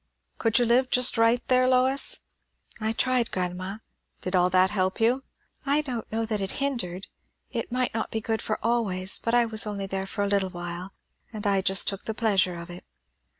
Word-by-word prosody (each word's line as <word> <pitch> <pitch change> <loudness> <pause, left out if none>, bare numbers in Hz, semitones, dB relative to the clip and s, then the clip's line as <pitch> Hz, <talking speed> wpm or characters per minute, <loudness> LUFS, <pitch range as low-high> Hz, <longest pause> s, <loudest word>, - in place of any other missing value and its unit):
"Could 225 0 +2
you 245 - +3
live 250 +2 +3
just 250 0 +5
right 230 +1 +2
there, 255 0 +4
Lois?" 260 +2 +3 0.6
"I 220 0 -1
tried, 250 0 +1
grandma." 185 +2 -3 0.4
"Did 185 +1 -2
all 180 0 +4
that 185 +1 +3
help 190 -2 -1
you?" 240 +4 +2 0.4
"I 290 +1 +2
don't 250 -6 -5
know 225 +1 -1
that 215 -2 -2
it 195 - -2
hindered. 235 -10 -2 0.5
It 235 -2 -4
might 250 0 -1
not 225 - -2
be 220 - -2
good 220 0 -2
for 215 - -2
always; 195 -6 0
but 230 +1 0
I 240 -1 +4
was 220 -1 +1
there 210 - -3
only 200 -1 -4 0.2
for 205 +1 -2
a - - 0
little 200 -1 +1
while, 175 +1 -6 0.4
and 215 -2 -7
I 200 -1 +2
just 190 0 +3
took 195 -1 -1
the 220 - -3
pleasure 195 -5 +2
of 170 +1 -8
it." 175 - -10
220 Hz, 200 wpm, -26 LUFS, 190-240 Hz, 0.6 s, just